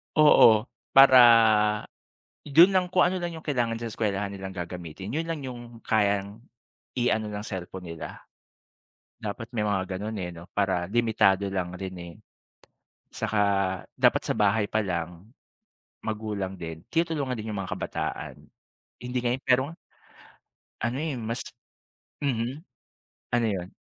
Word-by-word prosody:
Oo, 115 -8 +7 0.3
para 135 -1 +9 1.2
yun 165 +7 +6
lang 180 -1 +2
kung 180 - +4
ano 185 0 -1
lang 170 -1 -3
yung 160 - -15
kailangan 120 -5 0
sa 115 - -5
eskwelahan 100 -2 -2
nilang 95 -1 -7
gagamitin 90 +1 -7
yun 165 +2 -1
lang 165 -3 -4
yung 120 -3 -9
kayang 100 0 0 0.6
i-ano 110 -3 +1
ng 105 0 -5
cellphone 95 -1 -6
nila. 80 - -9 1.0
Dapat 110 +3 -6
may 115 - -2
mga 100 -2 +1 0.2
ganun, 110 +2 -4
eh, 90 -2 -4
'no, 85 +1 -12
para 95 -3 +1
limitado 105 -3 +2
lang 90 -2 -3
rin, 95 0 -6
eh. 85 -1 -9 1.0
'Tsaka 110 - -1 0.6
dapat - - +3
sa - - 0
bahay 105 +1 +2
pa 110 - 0
lang, 90 +1 -4 0.8
magulang 105 -3 -3
din, 80 -2 -8
tinulungan 160 -5 0
din 110 +1 -6
yung 105 - -4
mga 90 - -8
kabataan, - - -4 0.6
hindi 125 +1 -3
ngayon, 125 +2 0
pero 125 +1 +4 1.2
ano, 120 +4 -1
eh, 155 -4 -2
mas 115 +1 -3 0.8
mhm. 130 +2 -2 0.7
Ano 120 -1 +2
yun? 95 -3 -4
110 Hz, 135 wpm, -26 LUFS, 95-125 Hz, 1.2 s, para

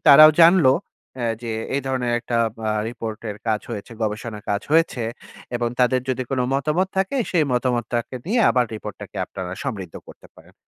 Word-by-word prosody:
তারাও 155 +2 +10
জানলো 165 -5 +7 0.4
অ্যা 120 -2 -2 0.2
যে 115 - -4 0.3
এই - - +1
ধরনের 125 -2 -1
একটা 120 - -2 0.3
আ - - +2 0.2
রিপোর্টের 110 -2 -6
কাজ 110 -1 +1
হয়েছে, 105 +3 -6
গবেষণার 105 0 -3
কাজ 100 0 0
হয়েছে, 160 -7 +3 0.5
এবং 120 0 0
তাদের 125 +1 +3
যদি 130 0 -1
কোন 130 -2 0
মতামত 155 +7 +1
থাকে, 195 +8 0
সেই 165 -4 +3
মতামতটাকে 120 -1 -1
নিয়ে 230 +5 +2
আবার 125 -1 +3
রিপোর্ট 105 -1 -7
টাকে - - -10
আপনারা 90 -1 -6
সমৃদ্ধ 100 -11 -5
করতে - - -14
পারেন।" - - -18
125 Hz, 170 wpm, -22 LUFS, 110-140 Hz, 0.5 s, তারাও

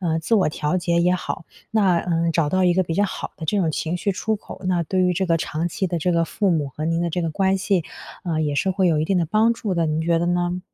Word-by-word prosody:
呃， 165 -3 0
自 165 +8 0
我 195 -7 +3
调 150 +2 -1
节 170 -1 +1
也 180 +1 +3
好。 175 - -4 0.3
那， 195 -6 +3
呃， 170 -1 0
找 160 -2 +1
到 185 +3 +2
一 180 - +4
个 185 - +3
比 165 -2 -3
较 205 - +3
好 195 - -5
的 160 - -7
这 205 +6 0
种 170 -5 +1
情 160 +2 -2
绪 190 +3 -1
出 220 +3 -1
口， 195 - -11
那 180 -2 +1
对 185 +3 -1
于 180 0 +3
这 190 +2 -1
个 165 -1 +3
长 160 +1 -2
期 190 +3 -2
的 175 -1 -2
这 180 +3 0
个 170 0 +2
父 195 +3 0
母 155 -5 0
和 150 +3 -6
您 165 +1 0
的 170 0 -1
这 180 - -1
个 165 - -1
关 190 +4 +1
系， 190 -3 +1 0.4
呃， 165 -3 -1
也 150 -2 -1
是 145 +7 +1
会 190 0 +1
有 160 -3 +2
一 - - +1
定 185 +3 +1
的 170 - +1
帮 215 +7 +3
助 215 -4 -3
的， 170 -1 +1
您 155 0 0
觉 165 +1 +2
得 170 - 0
呢？ 175 0 0
175 Hz, 320 characters per minute, -22 LUFS, 165-185 Hz, 0.4 s, 一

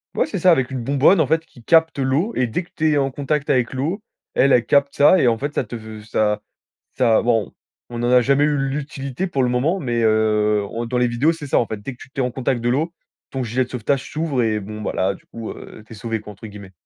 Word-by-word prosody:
Ouais - - +2
c'est 280 - -4
ça, 180 +1 +5
avec 130 -5 +2
une 125 -3 -4
bonbonne 140 +7 +4
en 140 - +1
fait 160 +1 +1
qui 120 - -18
capte 160 +1 +3
l'eau. 140 - 0
Et 125 - +1
dès 115 +11 -2
que 170 - -24
tu 155 0 +2
es - - +2
en 135 -1 +1
contact 145 +1 -2
avec 125 -1 +1
l'eau, 160 +11 -2 0.3
elle, 135 +1 +3
elle 120 - +4
capte 140 0 +2
ça. 150 +6 +6
Et 130 - +3
en 115 -1 +3
fait, 145 +3 -4
ça - - 0
te 120 +1 -8
v 110 -1 -9
ça 105 -1 0 0.6
ça, 115 -3 +4
bon, 115 -2 0 0.4
on 120 0 -4
en 120 - +1
a 125 0 +6
jamais 140 +3 +3
eu 150 -1 +1
l'utilité 140 +3 -3
pour 135 -7 0
le 125 - +1
moment, 150 +10 +1
mais, 120 -4 -1
heu 105 -1 +2
on 115 +1 -3
dans 125 - -1
les 125 - +3
vidéos, 120 +7 +2
c'est 150 -3 -8
ça, - - +2
en 115 - 0
fait. 110 - -4
Dès 130 +5 -6
que - - -22
tu 130 - -17
tu 135 - -3
es - - +1
en 125 - -1
contact 125 -1 -1
de 120 - 0
l'eau, 150 +7 0 0.4
ton 130 -1 -3
gilet 125 +3 0
de - - -20
sauvetage 130 +2 -2
s'ouvre 150 -5 -1
et 110 -1 0
bon 105 +2 -8
ben - - -3
là, 95 +1 0
du - - -20
coup, 115 -1 -7
heu, 110 - -11
t'es 115 - -12
sauvé, 115 +2 -3
quoi, 105 -1 -10
entre 105 +3 -11
guillemets. 100 -2 -11
130 Hz, 280 wpm, -21 LUFS, 115-145 Hz, 0.6 s, ça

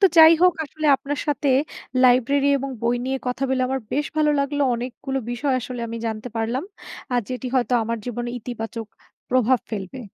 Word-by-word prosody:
তো - - +5
যাই 320 0 +10
হোক 360 -1 +7
আসলে 310 +1 -4
আপনার 280 +2 -4
সাথে 295 -1 0 0.6
লাইব্রেরি 260 +3 +4
এবং 275 +1 -4
বই 235 +1 +2
নিয়ে 265 +1 -1
কথা 250 +2 -2
বলে 260 -1 +1
আমার 265 0 -1
বেশ 295 +2 0
ভালো 305 -1 +3
লাগলো। 285 +1 0
অনেকগুলো 260 +3 -4
বিষয় 265 +3 0
আসলে 245 0 -6
আমি 230 - -5
জানতে 220 +2 -4
পারলাম। 235 +6 -1 0.5
আর 245 - +3
যেটি 255 0 -4
হয়তো 255 -1 +1
আমার 230 +1 -2
জীবনে 240 0 -3
ইতিবাচক 225 -1 -6 0.4
প্রভাব 255 0 +3
ফেলবে। 210 +3 -5
255 Hz, 180 wpm, -23 LUFS, 240-280 Hz, 0.6 s, যাই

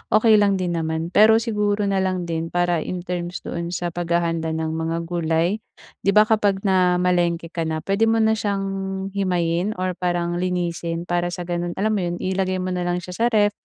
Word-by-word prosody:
okey 215 0 +6
lang 200 -1 +3
din 180 -2 -1
naman. 160 +1 -2
Pero 220 +3 +6
siguro 210 -2 0
na 195 - +1
lang 185 -1 0
din 165 0 -2
para 175 -1 +2
in 180 +3 -4
terms 175 0 -4
doon 170 0 -4
sa 175 0 -2
paghahanda 170 -2 -1
ng 160 0 -2
mga 160 +1 -2
gulay, 170 +4 0 0.5
'di 200 - +3
ba 210 - +8
kapag 205 -3 +2
namalengke 180 -3 +2
ka 165 -2 -2
na, 160 -1 -2
puwede 200 +3 +2
mo 225 0 +3
na 220 - +4
siyang 200 -2 -1 0.5
himayin 180 0 0
or 185 0 0
parang 175 -1 -1
linisin. 175 -2 -2
Para 175 0 -1
sa 175 0 -4
gano'n, 175 0 -3
alam 215 +3 0
mo 210 - +1
'yon, 175 -1 -2
ilagay 185 0 -1
mo 185 - -2
na 180 -1 -2
lang 175 0 -1
siya 180 - -8
sa 230 - +2
ref 210 -3 +3
180 Hz, 200 wpm, -22 LUFS, 170-195 Hz, 0.5 s, ba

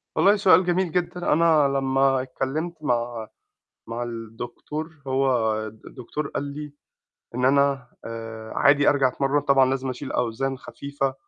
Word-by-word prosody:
والله 200 +1 +5
سؤال 190 -3 +5
جميل 180 0 +1
جدًا. 175 0 0
أنا 160 -3 +4
لمّا 135 -1 +2
اتكلّمت 135 +6 -3
مع 120 -4 -1 0.6
مع 115 +1 -3
الدكتور، 120 +7 -7
هو 130 -4 +2
الدكتور 125 +6 -7
قال 140 - -3
لي 145 +1 -7 0.6
إن 125 - -1
أنا 140 -1 +3 0.2
آآ 115 -1 -7
عادي 145 0 +5
أرجع 135 -2 +4
أتمرّن، 135 +3 0
طبعًا 135 -2 +4
لازم 135 0 -2
أشيل 130 +2 -6
أوزان 130 +3 -1
خفيفة 140 -1 -4
135 Hz, 135 wpm, -24 LUFS, 120-145 Hz, 0.6 s, والله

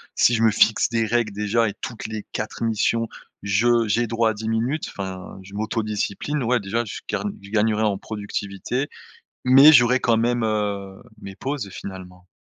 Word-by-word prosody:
si 120 - +4
je 115 - +1
me 110 - +6
fixe 110 +1 +3
des 115 -1 +1
règles 115 -1 0
déjà 105 +3 +1
et - - -6
toutes 115 -3 -5
les 110 -1 -6
4 110 +2 -4
missions 115 +1 +1 0.4
je 115 +4 +3
j'ai 115 +3 +1
droit 115 0 +1
à - - -4
10 110 +2 -6
minutes, 120 +7 -1
enfin, 95 -1 -7
je 100 - -14
m'autodiscipline, 110 +6 -2
ouais, 120 0 +1
déjà, 115 +4 -2
je 105 - -7
gagne 205 -1 -2
je 100 - -12
gagnerais 110 0 +2
en 105 -2 +1
productivité 105 +5 -4 0.6
mais 135 +4 +9
j'aurais 125 -1 +5
quand 115 -2 +3
même, 120 +1 +1
heu, 100 -3 -2 0.2
mes 100 0 -9
pauses, 135 -7 -4
finalement. 90 -2 -9
110 Hz, 180 wpm, -23 LUFS, 100-120 Hz, 0.6 s, mais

